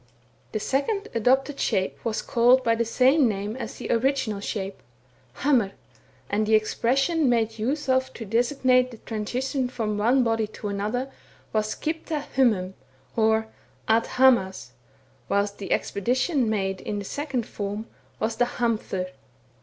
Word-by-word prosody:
The 215 - -2
second 340 - -1
adopted 265 +5 +2
shape 190 0 -1
was 225 -2 -2
called 245 +2 +4
by 230 - +3
the 230 +1 0
same 260 +4 +4
name 205 +1 -3
as 260 - -6
the - - -5
original 240 -3 +1
shape, 200 -1 -4 0.6
hamr, 250 -9 +3 0.5
and 210 +1 0
the 220 - +5
expression 270 +8 +2
made 225 -2 +1
use 275 +7 -1
of 260 0 +2
to 225 - -7
designate 250 +3 +2
the 235 - -11
transition 250 +5 -2
from 215 -4 -2
one 250 +5 +4
body 225 -2 +1
to 210 0 -6
another, 215 +7 -2 0.4
was 215 -1 0
at - - -21
slcipta 315 -1 -2
hbmum, 210 -8 +2 0.4
or 220 0 +3 0.4
at 225 +1 +3
hamaz; 235 - +3 0.6
whilst 200 +1 0
the 200 - -6
expedition 255 - +1
made 195 -3 -1
in 210 - -3
the 200 - -5
second 270 -1 -3
form, 205 +1 -4 0.3
was 220 0 -1
the 245 - +4
hamfor. 210 -6 -1
230 Hz, 145 wpm, -25 LUFS, 210-260 Hz, 0.6 s, the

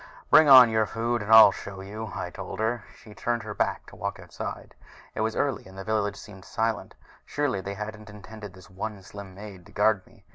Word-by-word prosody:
"Bring 155 -2 +7
on 130 -3 +10
your 110 -1 +2
food 120 +1 -2
and 105 +2 -4
I'll 110 -2 +10
show 95 0 -8
you," 105 +2 -7
I - - -5
told - - -7
her, 110 +1 +2 0.2
and - - -20
she 105 - -15
turned 120 +3 -2
her 105 -1 -6
back - - -1
to - - -14
walk - - -5
outside. - - -8 0.4
It - - -3
was 110 0 -1
early 140 -8 -1
and 95 0 -14
the 95 - -6
village 105 -1 -1
seemed 95 -3 -12
silent 115 +2 -3 0.3
surely 145 -9 -2
they 100 +1 -6
hadn't 105 +1 -7
intended 105 -1 -11
this 95 - -15
one 100 +1 -6
slim 100 -1 -11
maid 100 -2 -10
to - - -17
guard 105 -1 +1
me! 115 -4 -22
105 Hz, 220 wpm, -26 LUFS, 100-110 Hz, 0.4 s, on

